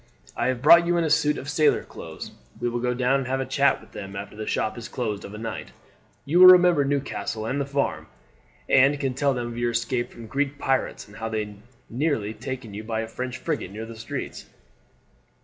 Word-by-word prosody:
I 120 - 0
have 130 -1 -1
brought 170 +3 +8
you 175 0 +2
in 170 - +2
a 160 - 0
suit 150 -1 +3
of 140 - -7
sailor 150 +1 +2
clothes; - - -9 0.3
we 120 - 0
will 120 0 -2
go 125 0 0
down 130 +2 +2
and 130 - -4
have 135 +1 -1
a 135 - -1
chat 140 +1 +2
with - - -18
them 100 -1 -8
after 100 +1 -7
the 110 0 -6
shop 110 - -1
is 120 - -7
closed 110 -5 -3
of 100 - -8
a - - -7
night. 115 +1 -6 0.5
You 165 +5 +2
will 185 - +11
remember 180 -4 +7
Newcastle 135 -5 -2
and 135 +5 -1
the 140 - -3
farm, 140 0 -1 0.6
and 140 +2 +4
can 135 -2 -1
tell 140 +1 +1
them 120 -1 -2
of 120 0 -6
your 120 0 +1
escape 120 +1 -1
from 115 - -11
Greek 140 +4 -2
pirates, 135 -5 -1
and 105 - -14
how 110 0 -4 0.6
nearly 135 -4 -1
you - - -5
were - - -21
taken 120 -6 -5
by 110 -1 -1
a 115 - -4
French 125 +1 -5
frigate 150 - -3
near 110 +3 -7
the 115 0 -9
straits." 110 0 -6
130 Hz, 225 wpm, -25 LUFS, 115-140 Hz, 0.6 s, will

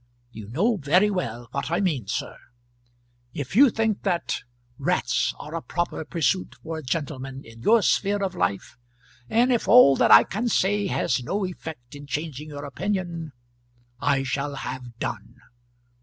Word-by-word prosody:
You 110 -3 -9
know 200 - +1
very 180 +7 +3
well 120 - -3
what 140 +2 -3
I 170 +2 +1
mean, 155 - -1
sir. 130 +6 -3 1.0
If 140 +4 -5
you 275 +3 +8
think 225 -2 0
that 180 -4 -1 0.4
rats - - 0
are 150 - -9
a 165 - -3
proper 175 -1 -3
pursuit 170 +4 0
for 160 0 -4
a - - -7
gentleman 135 -2 -4
in 115 0 -14
your 220 - +4
sphere 205 0 +1
of 190 - -1
life, 100 +6 -2 0.5
and 240 +3 +3
if 235 - -1
all 235 - +8
that - - +3
I - - +9
can 220 +6 -3
say 205 -2 +1
has 130 -8 0
no 195 +9 -1
effect 160 -8 -8
in 145 0 -10
changing 150 +1 -4
your 145 -1 -7
opinion 170 -1 -3 0.7
I 140 -1 +1
shall 140 +2 -2
have 125 -3 -7
done. - - -5
155 Hz, 160 wpm, -25 LUFS, 135-195 Hz, 1.0 s, I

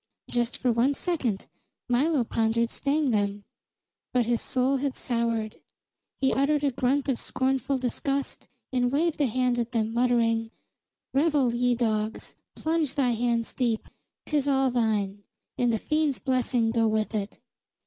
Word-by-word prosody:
Just 240 0 -1
for 250 - +1
one 245 +5 +2
second 265 - -1 0.4
Milo 270 +3 +2
pondered 230 0 0
staying 290 -1 +1
them. 205 -1 0 0.7
But 250 -2 +3
his 235 0 +1
soul 260 +2 +1
had 275 0 -2
soured; 230 -3 -1 0.6
he 265 - +2
uttered 285 +2 +2
a 280 - +2
grunt 260 +3 0
of 265 -3 0
scornful 265 +1 0
disgust, 275 +2 -2 0.3
and 245 -1 +2
waved 310 +2 +1
a 280 - +4
hand 250 +1 +1
at 235 +1 -3
them, 225 -1 0
muttering: 230 -2 +2 0.6
"Revel, 280 -4 +2
ye 245 0 +2
dogs! 220 -2 -1 0.2
Plunge 315 -3 -1
thy 265 -4 +2
hands 235 0 0
deep. 235 -4 -1 0.4
'Tis 290 -2 0
all 270 -2 +3
thine, 210 -4 0 0.4
and 245 -1 +3
the 225 - +1
fiend's 305 +1 0
blessing 250 -3 +1
go 225 -1 +2
with 215 0 0
it!" 205 -1 -3
245 Hz, 150 wpm, -27 LUFS, 230-275 Hz, 0.7 s, a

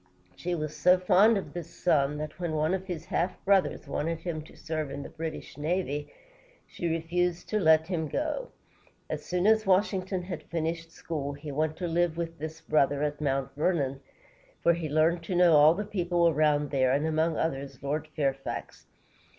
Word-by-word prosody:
She 175 0 -2
was 155 -2 -4
so 180 +1 +5
fond 200 +4 +5
of 195 - -5
this 170 -2 -6
son 150 -4 +1
that 155 +2 -6
when 170 -3 -2
one 155 +3 +1
of 190 0 -3
his 175 -4 -5
half 175 +2 -1
brothers 195 -1 +2
wanted 165 +1 -2
him 165 -2 -3
to - - -16
serve 155 -2 -3
in 140 +1 -5
the - - -9
British 160 -2 -6
navy, 150 -2 -2 0.5
she 175 - -4
refused 170 +2 -1
to 215 - +1
let 160 -3 +5
him 165 -3 -2
go. 310 - -2 0.6
As - - -3
soon 180 +1 -1
as 220 -1 +4
Washington 190 -1 +1
had 175 -3 -5
finished 165 0 -3
school, 150 -4 -4
he 145 +1 -7
went 155 +2 -1
to 180 - -2
live 170 0 +1
with 165 -1 -4
this 160 +1 -6
brother 145 -1 +2
at 150 0 -2
Mount 135 -2 -1
Vernon, 145 -3 0 0.6
where 170 - +5
he 165 -2 -3
learned 160 +3 +2
to 180 - -2
know 175 -2 +6
all 150 +2 +7
the 210 +3 -3
people 175 -3 +1
around 150 -2 +2
there, 130 -2 +3
and, 140 +3 +1
among 160 0 +1
others, 140 -4 -3
Lord 150 +2 -2
Fair´fax. 135 -2 -3
160 Hz, 185 wpm, -28 LUFS, 150-175 Hz, 0.6 s, all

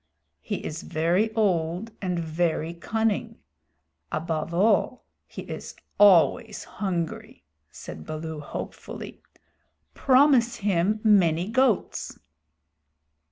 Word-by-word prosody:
"He - - -5
is 155 +1 -5
very 175 +7 0
old 185 0 0
and 180 -2 -1
very 165 0 -1
cunning. 225 +5 -2 0.7
Above 160 0 -2
all, 205 +7 +2 0.2
he - - -8
is - - -8 0.2
always 205 +2 +4
hungry," 175 - -4 0.3
said 80 -1 -10
Baloo 155 0 -5
hopefully. 145 - -8 0.7
"Promise 255 -3 +4
him 205 0 0
many 185 -4 +3
goats." 255 -4 0
185 Hz, 90 wpm, -25 LUFS, 165-220 Hz, 0.7 s, always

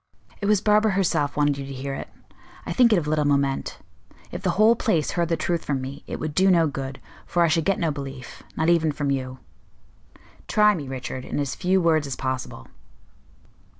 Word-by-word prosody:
"It 200 - -1
was 210 -2 +3
Barbara 210 0 +3
herself 165 -7 0
wanted 145 -1 +2
you 140 - -5
to 135 - -7
hear 135 +1 -5
it. - - -6 0.6
I - - -3
think 245 -2 +5
it 210 - +5
of 165 - -1
little 150 0 +1
moment. 140 -1 0 0.5
If - - -6
the - - 0
whole 220 +3 +6
place 175 -10 0
heard 170 -1 -1
the 165 - +1
truth 170 -1 -1
from 140 -2 -1
me, 135 +2 -7
it - - -5
would 155 -1 -4
do 190 +4 +4
no 170 -3 +4
good, 135 -2 -5 0.3
for 175 - +2
I - - +4
should 160 0 +1
get 195 - +2
no 165 -3 0
belief 135 -3 -8 0.2
not 160 - +1
even 165 -2 +3
from 145 -1 -2
you." 130 -1 -3 1.1
"Try 210 0 +4
me, 150 -8 -5
Richard, 130 0 -5
in - - -5
as 140 -2 -2
few 190 +1 +1
words 160 -4 +2
as 135 - -4
possible." 130 -1 -4
155 Hz, 210 wpm, -24 LUFS, 140-180 Hz, 1.1 s, whole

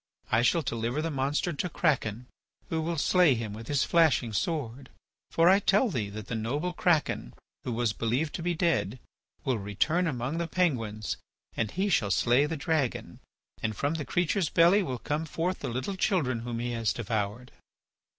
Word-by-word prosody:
I 110 - +4
shall 160 +7 +3
deliver 115 +2 -2
the 165 +1 -1
monster 145 +5 0
to 180 +5 -2
Kraken, 125 - 0 0.4
who 160 -1 -1
will 165 +1 -2
stay 170 -2 +4
him 110 -3 -4
with 110 +2 -9
his 145 -3 +2
flashing 155 -9 +3
sword. 135 - -2 0.4
For 165 +1 +3
I 190 +2 +7
tell 205 +4 +3
thee 110 -8 -2
that 105 0 -7
the - - -6
noble 140 +11 -2
Kraken, 165 - 0 0.3
who 125 - -3
was 115 -2 0
believed 125 +9 -1
to - - -4
be 175 +1 0
dead, 160 - +1 0.5
will 130 -5 +1
return 155 - 0
among 135 +2 -2
the 170 - -1
Penguins 115 - -1 0.4
and 115 - 0
he 190 - -1
shall 120 - +2
slay 120 +8 +3
the 160 +1 -3
dragon. 145 -3 -1 0.4
And 110 0 -1
from 145 +2 0
the 160 -2 -3
creature's 175 0 0
belly 175 +5 +5
will 130 -9 -3
come 150 +6 -2
forth 175 +4 -2
the 135 - -4
little 130 +11 -3
children 165 - +1
whom 120 0 -4
he 120 +1 -2
has 115 -2 0
devoured." 110 +1 -3
140 Hz, 180 wpm, -28 LUFS, 115-165 Hz, 0.5 s, I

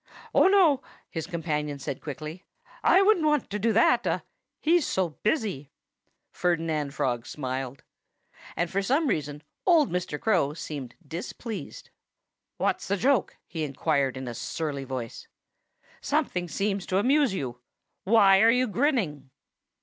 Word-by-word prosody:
"Oh, - - +6
no!" 355 -9 +5 0.3
his 160 -2 -4
companion 150 -5 -2
said 135 -1 -5
quickly. 155 +4 -7 0.4
"I 385 - +6
wouldn't 390 -5 +4
want 300 -7 +1
to 210 - -2
do 225 +3 +2
that 225 - +3 0.3
he's 330 -1 +3
so 185 -2 0
busy." 210 - -1 0.6
Ferdinand 160 -5 -1
Frog 120 -2 -1
smiled. 130 -1 -4 0.7
And 175 0 -1
for 195 - +1
some 275 +11 +1
reason 150 - -2 0.2
old 330 -6 +4
Mr. 180 -4 -2
Crow 175 -9 +1
seemed 140 -6 -6
displeased. 200 - -7 0.7
"What's - - -1
the 200 - 0
joke?" 255 +2 +1
he 160 -1 -4
inquired 140 -2 0
in 130 -1 -6
a 120 - -4
surly 140 +2 -4
tone. 125 -3 -4 0.9
"Something 175 -1 0
seems 195 +2 -2
to 185 - +1
amuse 265 +1 +3
you. 125 -7 -5 0.4
Why 195 -2 +6
are 225 - +7
you 250 +2 +4
grinning?" 205 - 0
175 Hz, 135 wpm, -27 LUFS, 145-230 Hz, 0.9 s, are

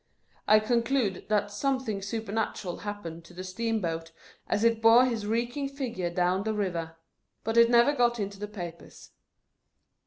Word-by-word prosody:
I 215 0 +7
conclude 235 -2 0
that 205 -1 +1
something 245 -2 -1
supernatural 210 -3 -3
happened 185 -6 -6
to 175 - -15
the 185 - -6
steam 225 +4 -2
boat, 165 -3 -3 0.4
as 210 - 0
it 230 -1 +3
bore 230 +3 +7
his 225 -5 -2
reeking 240 +5 -1
figure 245 -10 -3
down 180 +2 +1
the 220 +2 -1
liver; 170 -6 -2 0.5
but 225 +1 -2
it 235 0 +7
never 240 +4 +5
got 240 -3 +2
into 200 -1 -4
the 210 - -4
papers. 175 -5 -9
215 Hz, 155 wpm, -28 LUFS, 185-235 Hz, 0.5 s, I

